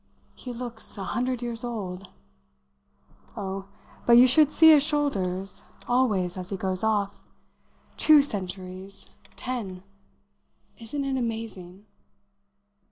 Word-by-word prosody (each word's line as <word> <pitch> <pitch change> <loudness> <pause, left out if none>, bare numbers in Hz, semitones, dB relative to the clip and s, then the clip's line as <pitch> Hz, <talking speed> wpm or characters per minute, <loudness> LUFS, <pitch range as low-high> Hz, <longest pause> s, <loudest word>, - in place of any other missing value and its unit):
"He 250 - -8
looks 235 -2 -6
a 195 - -4
hundred 245 +5 -2
years 235 0 -4
old!" 195 -6 -5 1.3
"Oh, 195 -1 -4 0.4
but 240 - +6
you 240 +2 +9
should 295 +3 +5
see 320 0 +7
his 300 -2 +7
shoulders, 195 -11 -1 0.2
always, 205 -8 +1
as 180 - -6
he 195 - -3
goes 185 0 -2
off! 205 -2 -1 0.7
Two 305 -2 +6
centuries 190 -4 -5 0.2
ten! 205 -8 -5 1.0
Isn't 275 +5 -4
it 270 -1 -1
amazing?" 215 -5 -5
220 Hz, 110 wpm, -26 LUFS, 190-250 Hz, 1.3 s, you